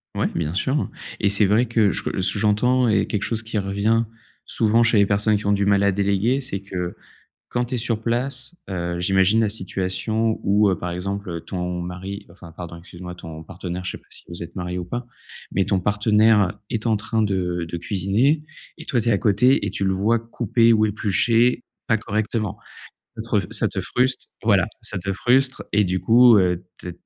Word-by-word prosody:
Ouais, - - +1
bien 80 -1 -1
sûr 135 +9 -1 0.3
et 100 - +2
c'est 100 +1 +4
vrai 105 +5 +3
que 110 -4 +2
je - - -4
re 95 - -2
ce - - +1
que 100 - -3
j'entends 120 +4 +3
est 105 -2 +2
quelque 105 - -2
chose 115 -2 -1
qui 110 0 -4
revient 100 +3 +1 0.4
souvent 115 +1 +2
chez 115 -1 +3
les 100 - +4
personnes 105 +1 +2
qui 100 - -5
ont - - +3
du 100 0 +2
mal 100 0 +3
à 100 - +4
déléguer, 100 +6 +1
c'est 100 -7 -5
que, 90 -3 -4 0.5
quand 120 0 0
tu 125 +2 -4
es - - -1
sur 115 -1 -1
place, 130 +5 -2
heu, 85 -2 -3
j'imagine 95 +4 +3
la 110 - +2
situation 100 +3 -2
où, 100 +1 +4
heu, 95 - 0
par 90 - -4
exemple, 90 -1 -4
ton 90 -1 -3
mari, 95 +3 -6
bah, 85 - -17
enfin, 85 -3 -12
pardon, 85 0 -8
excuse 85 0 -14
moi, 90 -1 -6
ton 80 -2 -9
partenaire, 90 +1 -6
je - - -2
sais - - -6
pas - - -31
si - - -9
vous 85 0 -6
êtes 85 - -11
mariés 90 -1 -3
ou 90 - -5
pas. 120 +5 -4 0.5
Mais 95 - +2
ton 95 - +1
partenaire 105 0 +3
est 115 +1 -2
en 110 -2 +3
train 110 +2 -1
de 90 -4 -1
de 85 - -3
cuisiner 105 - +1 0.4
et 160 - -9
toi, 125 - +1
tu 115 - 0
es - - +4
à 100 - +3
côté 125 +6 +3
et - - -1
tu 100 - -2
le 95 - +2
vois 105 +5 +2
couper 115 0 +2
ou 110 -1 +3
éplucher 115 +4 +2 0.2
pas 115 - +3
correctement. 110 -1 -2 0.6
Ça - - -4
te - - -14
rev - - +1
ça - - 0
te - - -3
fruste 125 +1 -1 0.2
voilà, - - +4 0.2
ça - - -3
te 95 +2 -3
frustre 130 +6 +1
et 105 0 +4
du 90 0 -1
coup, 115 +4 +6
heu, 90 -1 +1
t 90 - -7
100 Hz, 220 wpm, -22 LUFS, 95-115 Hz, 0.6 s, coup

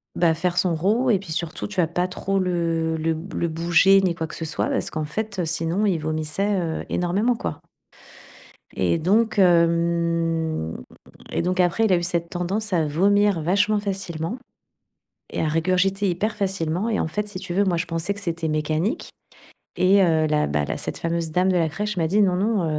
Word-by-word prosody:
bah 170 -2 +3
faire 175 +1 -1
son 175 -1 +2
rot, 215 +10 +1
et 205 -5 +3
puis 185 -4 -9
surtout 165 +3 -3
tu 210 - -10
vois 165 - +2
pas 180 +2 -1
trop 195 +1 -2
le 165 -3 0
le 160 +1 0
b 165 +3 -8
le 170 - -1
bouger 170 +4 +4
ni 185 -3 +1
quoi 160 -1 -3
que - - -9
ce 165 - -5
soit, 160 - -1
parce - - -1
qu'en 155 -1 -3
fait, 210 +5 -4
heu, 175 - 0
sinon 165 +5 0
il 180 -4 +1
vomissait, 155 +6 -1
heu, 165 -2 -3
énormément 200 +8 +1
quoi - - -5 1.2
et 170 - +1
donc 215 +7 +2
hem 170 - +1 0.5
et - - -1
donc 180 +1 0
après, 180 +5 +2
il 210 - +3
a - - +5
eu 175 - -1
cette 170 -1 -1
tendance 195 +4 -3
à 160 -3 +2
vomir 200 +4 +2
vachement 200 +5 +2
facilement 195 0 -4 0.9
et - - -2
à 155 - +1
régurgiter 185 +5 +1
hyper 205 +5 -1
facilement, 190 -1 -1
et 215 - 0
en - - 0
fait, 210 +6 -3
si 205 -3 -7
tu 175 -1 -6
veux, 200 - +3
moi, 185 -3 +1
je 170 - -2
pensais 165 +4 -2
que 200 - -8
c'était 165 -4 -3
mécanique, 155 +5 -1 0.7
et 195 +2 +4
heu, 160 -3 +3
la 150 -1 +1
bah 75 0 0
la - - -3
cette - - -5
fameuse 165 -1 -2
dame 180 +3 +2
de 185 - +2
la 165 -2 +2
crèche 210 +5 -3
m'a 165 -2 +1
dit: 205 +5 +2
«Non, 185 -2 +3
non, 205 -1 +1
175 Hz, 205 wpm, -23 LUFS, 165-195 Hz, 1.2 s, a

